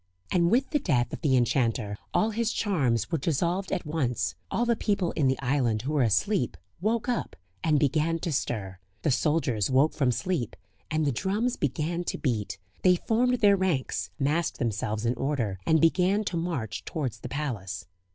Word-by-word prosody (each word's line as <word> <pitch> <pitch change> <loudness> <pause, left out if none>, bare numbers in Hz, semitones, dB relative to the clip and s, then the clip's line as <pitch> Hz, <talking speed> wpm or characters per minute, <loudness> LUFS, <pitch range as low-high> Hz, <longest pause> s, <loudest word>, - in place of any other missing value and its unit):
And 170 -1 +3
with 255 +6 +2
the 295 - +2
death 125 - +1
of - - -5
the 140 -5 +3
enchanter 115 -4 +1 0.2
all 220 - +2
his 230 +1 0
charms 135 - 0
were 165 - +1
dissolved 175 +6 0
at 180 - -1
once; 150 -6 -1 0.2
all 240 - 0
the 235 -1 +2
people 200 -5 0
in 145 -4 +1
the 130 - +2
island 125 -5 +1
who 145 +4 -2
were 145 - +3
asleep 125 - +1 0.2
woke 220 +4 0
up, 245 -2 -2 0.3
and 155 -2 +3
began 155 +3 +2
to 175 - -2
stir. 100 -9 -2 0.2
The 155 - +2
soldiers 130 - +1
woke 135 +4 +4
from 135 -4 +2
sleep, 160 - -2 0.3
and 155 0 +1
the 140 - +2
drums 205 - 0
began 155 +5 -1
to - - -2
beat; 110 -8 -2 0.2
they 180 -1 +5
formed 240 +6 +1
their 200 -2 +6
ranks, 185 -9 -1
massed 155 +4 0
themselves 110 -1 -2
in 120 - +2
order, 120 -9 -1
and 160 - +5
began 185 +6 +3
to 185 - -3
march 165 - -3
towards 130 -8 -3
the 125 - -7
palace. 115 -10 -4
150 Hz, 180 wpm, -27 LUFS, 125-185 Hz, 0.3 s, their